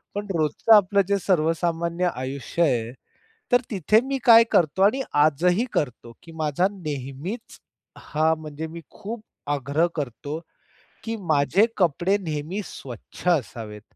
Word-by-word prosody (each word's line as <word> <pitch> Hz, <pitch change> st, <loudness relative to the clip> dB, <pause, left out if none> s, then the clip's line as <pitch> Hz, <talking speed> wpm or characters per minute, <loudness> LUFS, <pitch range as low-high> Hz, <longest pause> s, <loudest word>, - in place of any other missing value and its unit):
पण 205 Hz, 0 st, -3 dB
रोजचं 155 Hz, +8 st, +3 dB
आपलं 200 Hz, -1 st, +4 dB
जे 200 Hz, 0 st, +2 dB
सर्वसामान्य 170 Hz, 0 st, 0 dB
आयुष्य 135 Hz, +6 st, -4 dB
आहे, 120 Hz, -7 st, +1 dB, 0.6 s
तर 245 Hz, -, +5 dB
तिथे 210 Hz, +2 st, +3 dB
मी 275 Hz, 0 st, -1 dB
काय 230 Hz, -2 st, +8 dB
करतो 170 Hz, +2 st, +2 dB
आणि 245 Hz, +7 st, +3 dB, 0.2 s
आजही 175 Hz, -, +2 dB
करतो, 125 Hz, -4 st, -2 dB
की 165 Hz, -, -12 dB
माझा 155 Hz, +3 st, +1 dB
नेहमीच 155 Hz, -, -6 dB, 0.4 s
हां 160 Hz, +1 st, +1 dB
म्हणजे 155 Hz, +1 st, -6 dB
मी 165 Hz, +1 st, -9 dB
खूप 215 Hz, +2 st, -8 dB, 0.3 s
आग्रह 145 Hz, +5 st, +1 dB
करतो, 145 Hz, +2 st, -4 dB, 0.6 s
की 225 Hz, 0 st, -3 dB, 0.2 s
माझे 150 Hz, +9 st, +4 dB
कपडे 180 Hz, +2 st, +2 dB
नेहमी 165 Hz, +2 st, -4 dB
स्वच्छ 125 Hz, -, -10 dB
असावेत. 115 Hz, -, -1 dB
165 Hz, 130 wpm, -24 LUFS, 145-200 Hz, 0.6 s, काय